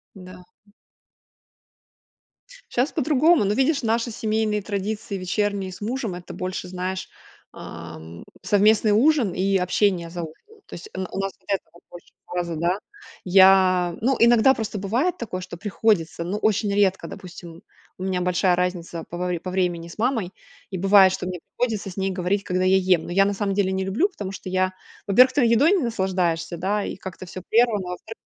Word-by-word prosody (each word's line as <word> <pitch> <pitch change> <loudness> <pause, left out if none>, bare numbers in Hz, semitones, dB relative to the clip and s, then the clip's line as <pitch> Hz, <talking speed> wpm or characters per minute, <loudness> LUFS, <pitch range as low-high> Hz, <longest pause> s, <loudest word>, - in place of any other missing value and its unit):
М-да, 185 -1 -11 0.3
м. 205 - -26 2.0
Щас 255 +6 +1
по-другому. 305 - +3
Ну, 205 - +1
видишь, 275 +2 +2
наши 230 +1 0
семейные 215 -1 -1
традиции 205 0 -4
вечерние 195 +1 -2
с 185 - -12
мужем- 230 -2 -3
это 180 - -9
больше, 185 0 -4
знаешь, 185 +1 -4 0.4
ам, 85 0 -10 0.2
совместный 210 +1 +4
ужин 245 - +3
и 195 +1 +1
общение 180 -2 0
за 175 -1 -5
ужином. 400 - -12
То - - -9
есть, 175 - -9
э, 190 - -6
н 185 - -3
у - - -6
нас 195 0 -2
вот - - -28
этого 185 -3 -3
больше 175 - -14
фаза, 175 -2 -3
да. 175 +4 0 0.5
Я, 185 -2 +5
ну, 260 +3 +2
иногда 235 +3 +6
просто 220 -3 -4
бывает 240 - 0
такое, 185 -6 -5
что 180 -2 -8
приходится, 175 -4 0
ну, 190 +5 -3
очень 210 -1 +1
редко, 200 -2 +1
допустим. 170 -2 -11 0.3
У 185 - -7
меня 185 -1 -1
большая 180 0 +2
разница 175 -2 -3
по 175 - -6
вре 180 -1 -2
по 185 - -6
времени 175 -2 -1
с 170 - -12
мамой 225 -6 0 0.4
и 190 - -4
бывает, 195 0 +6
что 180 - -4
мне 180 -1 -5
приходится 220 -3 -3
с 180 - -11
ней 190 0 -1
говорить, 190 +2 -1
когда 185 0 -1
я 190 +1 +5
ем. 185 -3 +2
Но - - -7
я 195 +2 +4
на 200 - 0
самом 195 -1 -2
деле 195 -2 +1
не 190 0 -1
люблю, 225 - +1
потому 200 - -6
что 190 - -9
я, 185 0 0 0.3
во-первых, 255 +6 +6
ты 280 - +2
едой 235 - +4
не 385 -5 +3
наслаждаешься, 185 -6 -1
да, 200 +4 -1
и - - -5
как-то 185 -1 -8
всё 180 +1 -8
прервано. 220 -5 +2
А - - -4
во-вторых, 220 +5 -9
190 Hz, 185 wpm, -23 LUFS, 180-215 Hz, 2.0 s, иногда